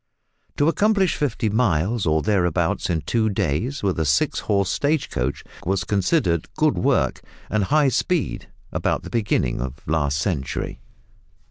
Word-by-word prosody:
To 145 - +3
accomplish 200 +1 +2
fifty 125 -6 -1
miles 105 -2 +1
or 80 0 +2
thereabouts 95 -6 +1
in 80 -2 0
two 110 +5 +1
days 100 - -1
with 95 -4 0
a - - +2
six 70 0 +2
horse 100 -3 0
stage 145 0 0
coach, 65 +3 -2 0.2
was 95 0 0
considered 95 - +1
good - - +2
work - - +1 0.3
and 110 -2 +1
high 150 +4 +3
speed 175 +3 -1 0.2
about - - -1
the - - -9
beginning 100 - 0
of 65 +1 -6
last 75 -2 +1
century. 75 -4 -2
100 Hz, 145 wpm, -23 LUFS, 80-125 Hz, 0.3 s, To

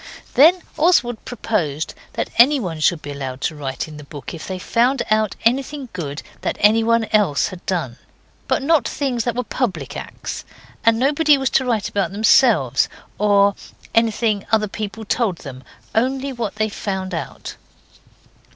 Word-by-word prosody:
Then 330 +6 +6 0.2
Oswald 255 -9 +3
proposed 170 - -2 0.2
that - - -3
anybody 235 - +4
should 155 +1 +2
be 145 - -6
allowed 135 -2 -5
to 155 - -1
write 135 -1 -4
in 155 -1 -10
the 150 - -9
book 145 +2 -9
if 165 - -8
they 190 - -4
found 240 +7 +1
out 215 -1 +2
anything 270 +2 0
good 145 -4 -5 0.2
that - - -2
anyone 225 +2 +4
else 200 -10 +3
had 185 -1 -10
done, 160 -11 -2 0.5
but - - +1
not 315 +1 +3
things 255 -5 -2
that 240 - -1
were 250 - -1
public 185 - -3
acts; - - -6 0.4
and 225 0 +4
nobody 290 +3 +4
was 265 -1 -1
to 260 - +2
write 225 -5 0
about 200 -2 -1
themselves, 215 +3 +4 0.3
or 200 -1 +4 0.4
anything 225 -2 +2
other 215 -1 +3
people 215 +2 -6
told 215 -5 0
them, 130 -5 -9 0.3
only 265 +4 0
what 230 -5 -4
they 215 0 +1
found 190 -3 -4
out. 165 - -6
215 Hz, 160 wpm, -20 LUFS, 175-250 Hz, 0.5 s, Then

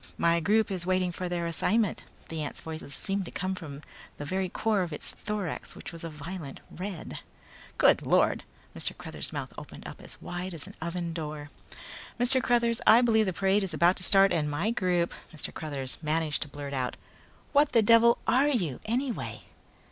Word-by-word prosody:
"My 170 0 +3
group 215 +5 +2
is 185 -3 -2
waiting 185 0 +1
for 180 +1 -4
their 175 -1 -1
assignment." 205 +5 +1 0.2
The 160 -1 -3
ant's 145 - -5
voice 160 -1 -6
seemed 195 +6 -1
to - - -8
be - - -23
coming 185 0 -1
from 150 -6 -7 0.4
the 145 - -5
very 185 +3 -1
core 215 +1 +1
of 175 -2 -2
its 150 - -3
thorax 210 -6 -4
which - - -8
was 165 -1 -6
a 165 - -4
violent 150 -1 -7
red. 185 -2 -6 0.6
"Good - - +5
Lord!" - - +3 0.3
Mr. - - -3
Cruthers' - - -4
mouth - - -5
opened - - -10
up - - -9
as - - -8
wide 175 0 -5
as 150 - -3
an - - -11
oven 170 0 -3
door. 150 -2 -5 0.7
"Mr. 255 +2 +5
Cruthers, 235 -1 +2
I 230 +2 +9
believe 220 -3 +4
the - - +1
parade 195 +3 +2
is 185 -5 -2
about 170 +3 +5
to 180 - -7
start 195 0 +6
and 150 -3 +1
my 170 +10 0
group 180 -6 +1
" - - -23
Mr. 150 - -5
Cruthers 140 -4 -4
managed 155 -1 0
to - - -1
blurt 140 0 -7
out. 130 -2 -1 0.6
"What 290 0 +4
the 230 - +6
devil 230 +2 +6
are 260 +5 +4
you 180 - 0
anyway!" 245 +3 -2
180 Hz, 195 wpm, -29 LUFS, 160-210 Hz, 0.7 s, I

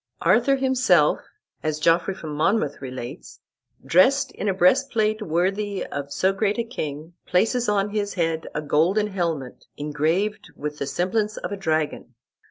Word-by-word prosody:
"Arthur 275 -1 +4
himself," 255 - +3 0.4
as 155 -1 -1
Geoffrey 170 +4 +2
of - - -14
Monmouth 150 +1 0
relates, 130 -2 -8 0.5
"dressed 260 - +4
in 205 - -3
a - - +2
breastplate 215 +2 +2
worthy 195 +3 -1
of 140 0 -6
so 190 +6 +1
great 205 +2 0
a 235 - 0
king, 155 - -6
places 225 +5 +2
on 205 0 +1
his 205 -1 -2
head 165 -3 -1
a 150 - -2
golden 165 +8 +2
helmet 170 -10 -3
engraved 155 +8 -1
with 150 0 -5
the 140 - -2
semblance 210 +7 -1
of - - -5
a - - -2
dragon. 155 -8 -2
180 Hz, 150 wpm, -24 LUFS, 155-210 Hz, 0.5 s, Arthur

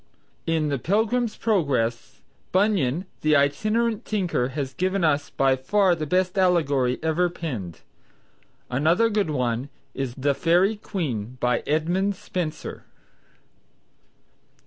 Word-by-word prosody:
In 160 -2 +1
the 140 -2 -1
"Pilgrim's 220 - 0
Progress," 130 - 0 0.3
Bunyan, 185 - +1 0.2
the 155 0 +3
itinerant 215 +11 +1
tinker, 180 - 0
has 135 0 -4
given 185 +5 0
us 145 -2 +1
by 135 -1 +2
far 185 +8 +2
the 155 -3 -3
best 185 +3 +1
allegory 145 -9 +2
ever 165 +2 +2
penned. 120 - -6 0.9
Another 165 - +2
good 205 -5 +1
one 125 -2 -1 0.2
is 135 -3 -4
"The 140 +1 +1
Faerie 180 +8 +2
Queen" 130 - -4
by 125 -1 +1
Edmund 175 +6 +1
Spenser. 170 -4 -5
160 Hz, 115 wpm, -24 LUFS, 135-190 Hz, 0.9 s, the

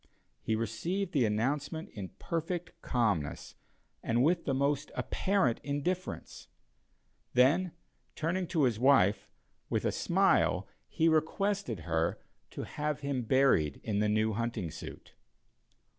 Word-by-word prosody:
He 110 - 0
received 165 - -2
the 130 -9 +3
announcement 145 +9 -1
in 100 -4 -6
perfect 170 +1 -3
calmness, 105 - -1 0.5
and 120 +2 +1
with 170 +3 +2
the 135 - 0
most 140 +2 0
apparent 190 - +1
indifference; 170 +6 -3 0.9
then, 155 +8 +4 0.4
turning 175 +3 -1
to 160 -4 +1
his 120 -4 +2
wife, 120 -7 +4 0.4
with - - 0
a - - +2
smile - - +2 0.2
he 160 - +1
requested 160 - 0
her 80 0 0 0.3
to - - -6
have 150 -1 -3
him 140 -3 -1
buried 120 - +3
in 105 -2 -1
the 105 0 +2
new 110 +1 +2
hunting 115 -6 -2
suit. - - -10
135 Hz, 125 wpm, -31 LUFS, 110-165 Hz, 0.9 s, then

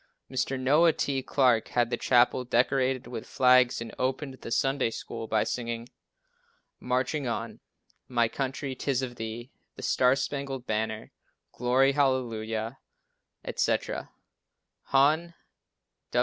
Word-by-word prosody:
Mr. 130 0 -1
Noah 150 +6 +4
T. 135 -2 -1
Clarke 125 -4 +2
had 120 -1 0
the - - +2
chapel 125 0 +3
decorated 130 +1 +1
with 115 -3 -7
flags 125 -1 +4
and 115 - -7
opened 135 +2 -1
the - - -7
Sunday 135 +1 +1
School 115 0 -6
by 110 -1 +2
singing, 115 0 -4 0.9
"Marching 130 +3 -1
On," 115 -1 -4 0.5
"My 120 -2 +2
Country, 135 +2 -3
'tis 130 0 -1
of 120 -2 -5
Thee," 115 +3 -6 0.2
"The - - -9
Star 125 +1 +3
Spangled 135 -2 -4
Banner," 110 0 -2 0.4
"Glory, 130 +3 +3
Hallelujah," 120 -4 -1 0.7
etc. - - -1 0.8
Hon. 155 +5 +2
130 Hz, 120 wpm, -28 LUFS, 115-135 Hz, 0.9 s, Noah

